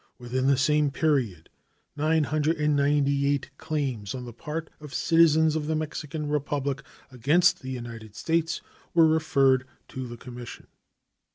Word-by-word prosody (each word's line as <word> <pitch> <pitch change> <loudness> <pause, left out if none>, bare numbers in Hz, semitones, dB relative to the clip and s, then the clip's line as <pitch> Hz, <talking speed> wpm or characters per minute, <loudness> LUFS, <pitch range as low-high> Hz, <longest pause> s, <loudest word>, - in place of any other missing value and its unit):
Within 130 +1 -1
the 140 -1 +4
same 150 +2 +3
period 135 - 0 0.5
998 145 -2 +1
claims 135 -8 -3
on 125 -1 -6
the 120 - -8
part 155 +7 -5
of 150 -2 -9
citizens 160 -1 +4
of 150 -1 -2
the 160 - 0
Mexican 155 -1 -4
Republic 145 -2 -1 0.3
against 150 +8 +3
the 130 - -7
United 115 -4 -7
States 165 0 0 0.3
were 165 -1 +7
referred 140 -5 +3 0.2
to 130 -1 -5
the 120 0 -8
commission. 120 -1 -9
145 Hz, 125 wpm, -26 LUFS, 130-155 Hz, 0.5 s, were